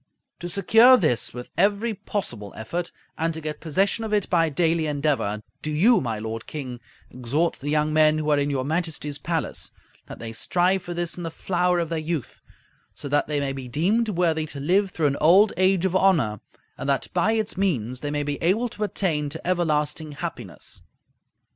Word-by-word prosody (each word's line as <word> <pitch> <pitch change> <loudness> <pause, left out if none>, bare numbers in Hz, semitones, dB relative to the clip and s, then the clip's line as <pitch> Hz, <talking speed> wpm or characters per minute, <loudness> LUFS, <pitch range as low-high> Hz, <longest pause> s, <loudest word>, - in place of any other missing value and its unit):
To 175 - -5
secure 225 +8 +6
this 155 - 0
with 125 +1 -9
every 205 +5 +2
possible 170 - -5
effort 170 +11 -4 0.3
and 165 0 0
to - - -5
get 155 -1 -5
possession 195 +7 0
of 220 - -4
it 210 -2 +1
by 165 -2 +3
daily 165 +1 +1
endeavor, 140 -8 -1 0.2
do 155 - -3
you, 200 +11 +4
my 115 -4 -2
lord 110 +1 -5
King, 130 -5 -6 0.3
exhort 135 +7 -1
the 145 - -4
young 150 0 +1
men 155 0 +5
who 155 -1 -2
are 145 - +4
in 145 0 0
your 135 -2 -1
Majesty's 155 -2 -2
palace, 165 +1 -2 0.4
that - - -9
they 115 -1 -7
strive 180 +10 +1
for 175 0 -6
this 175 0 -2
in - - -5
the 165 - -3
flower 180 +1 0
of 170 -2 -1
their 165 -1 -1
youth, 155 -4 -4 0.5
so - - -7
that 145 +1 +2
they 150 -1 0
may 140 -1 -1
be 135 -2 -7
deemed 200 - +1
worthy 165 -5 +1
to 145 - -6
live 190 +7 +2
through 165 -4 -2
an 140 -1 +2
old 195 +7 +6
age 185 0 +3
of 190 -1 0
honor, 165 - +3 0.4
and 140 - -3
that 140 - +1
by 190 +5 +2
its 220 -1 -1
means 130 - -1
they 145 - -4
may 145 0 -1
be 145 0 -3
able 215 +9 +2
to 215 - -5
attain 160 -8 -1
to 160 +3 -7
everlasting 155 -3 0
happiness. 140 - -7
160 Hz, 200 wpm, -24 LUFS, 145-185 Hz, 0.5 s, secure